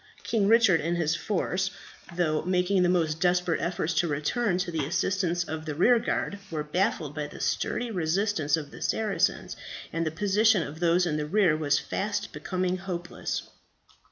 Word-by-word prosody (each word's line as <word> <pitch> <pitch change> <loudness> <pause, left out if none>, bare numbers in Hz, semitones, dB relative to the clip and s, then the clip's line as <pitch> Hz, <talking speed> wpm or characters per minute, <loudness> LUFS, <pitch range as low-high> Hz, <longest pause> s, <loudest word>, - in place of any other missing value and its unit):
King 210 -4 +1
Richard 220 -6 +5
and 170 +2 -1
his 165 -1 +1
force, 190 -1 -1 0.5
though 155 -3 +1
making 180 +2 +1
the 180 - +3
most 160 -3 +1
desperate 180 -3 +2
efforts 170 0 -1
to 175 - +2
return 175 - 0
to 180 -1 -2
the 160 -3 -1
assistance 175 +3 0
of 160 -1 -6
the 150 - -3
rearguard, 210 +1 +2
were 155 -2 -3
baffled 160 -2 -1
by 150 -1 -3
the - - -11
sturdy 240 -1 -1
resistance 170 -3 +1
of 145 -2 -7
the - - -11
Saracens, 215 -3 0 0.4
and 165 - 0
the 160 - 0
position 205 +3 +3
of 155 +2 -8
those 175 +1 +3
in 155 -3 -1
the 150 0 -2
rear 185 -2 +3
was 145 -2 +1
fast 205 0 -3
becoming 185 0 -2
hopeless. 175 -1 -4
175 Hz, 170 wpm, -27 LUFS, 160-195 Hz, 0.5 s, Richard